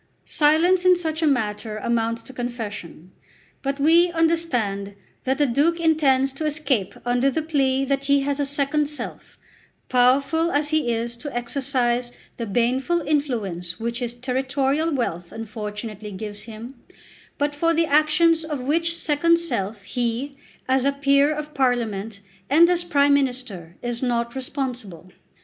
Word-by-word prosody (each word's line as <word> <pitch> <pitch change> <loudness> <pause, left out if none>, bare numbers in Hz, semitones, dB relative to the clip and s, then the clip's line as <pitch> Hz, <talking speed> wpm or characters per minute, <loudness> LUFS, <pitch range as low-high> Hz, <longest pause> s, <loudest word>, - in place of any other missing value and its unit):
Silence 330 +4 +3
in 365 0 +6
such 320 -2 -3
a 320 - +3
matter 215 -5 -1
amounts 230 +1 -1
to 265 - -12
confession. 210 -8 -6 0.5
But 275 +1 -2
we 335 +4 +5
understand 250 -13 0 0.3
that 265 +1 +1
the 295 - +3
Duke 295 +7 +2
intends 275 -5 +3
to 310 +3 -4
escape 280 -10 0
under 245 +2 +2
the 315 +3 -2
plea 275 -4 +1
that 275 0 -1
he 280 0 +3
has 280 +1 -1
a 285 - +1
second 285 +1 0
self, 295 - -7 0.5
powerful 275 +7 +3
as 295 -1 +1
he 305 -6 +1
is 235 +1 -2
to 285 +2 -7
exercise 245 -1 -1 0.3
the 230 - -4
baneful 255 - +1
influence 230 - -2
which 235 +1 -3
his 240 -1 -4
territorial 270 +5 0
wealth 175 - -2
unfortunately 215 -1 -6
gives 205 +2 -6
him, 235 +4 -10 0.6
but 290 0 0
for 330 +3 +1
the 330 0 +2
actions 310 +2 +3
of 305 -3 -4
which 330 +6 0
second 335 +3 +2
self 210 - -3
he, 240 +6 -2 0.3
as 260 0 +2
a 280 - +3
Peer 280 +1 +3
of 300 0 -5
Parliament 225 -6 -1 0.3
and 320 +5 +6
as 350 -1 +1
Prime 285 -4 +3
Minister, 245 -11 -2
is 240 -1 -3
not 235 -2 -1
responsible. 250 - -5
265 Hz, 150 wpm, -23 LUFS, 235-300 Hz, 0.6 s, in